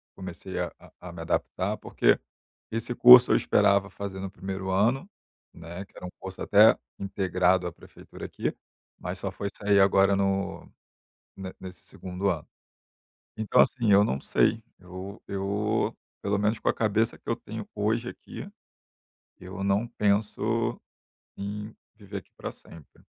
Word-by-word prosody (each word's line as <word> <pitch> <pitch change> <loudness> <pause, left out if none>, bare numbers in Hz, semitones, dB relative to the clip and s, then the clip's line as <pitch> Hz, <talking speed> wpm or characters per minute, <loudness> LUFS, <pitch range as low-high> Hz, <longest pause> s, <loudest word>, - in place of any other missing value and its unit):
comecei 90 -2 -7
a - - -2 0.3
a 90 - -8
me 85 -1 -8
adaptar, 80 - -1
porque - - +2 0.5
esse 115 +2 -2
curso 125 +1 +9
eu - - +6
esperava 100 -1 +3
fazer 100 -2 -6
no 95 -1 -5
1º 95 -1 -5
ano, 115 - +2 0.5
né, 85 +3 -8
que - - -32
era - - -8
um 90 - -7
curso 95 0 -8
até 105 +2 +6 0.2
integrado 95 -2 +1
à 85 - -6
prefeitura - - -12
aqui, - - -3 0.4
mas - - -5
só - - -3
foi 100 - -4
sair 100 -1 +3
agora 95 0 +5
no 95 0 -1 0.7
ne 95 -1 -6
nesse 90 -1 -9
2º 95 +2 -3
ano. 80 -5 -2 0.9
Então, 110 -1 +3
assim, 115 -5 +3
eu 100 +1 +7
não 70 -9 -1
sei. 115 0 +2 0.2
Eu 95 +2 -9
eu, 100 +2 -1 0.3
pelo 100 0 0
menos 105 +2 +1
com - - 0
a - - +4
cabeça 110 +1 +1
que - - -19
eu 115 - +1
tenho, 110 0 -8
hoje 110 +3 0
aqui, - - -9 0.9
eu 95 +1 -7
não 100 +4 +2
penso 110 +1 0 0.6
em 105 +2 -5 0.2
viver 100 -2 -9
aqui 90 - -15
pra - - -5
sempre. 80 -3 -15
100 Hz, 155 wpm, -27 LUFS, 95-105 Hz, 0.9 s, curso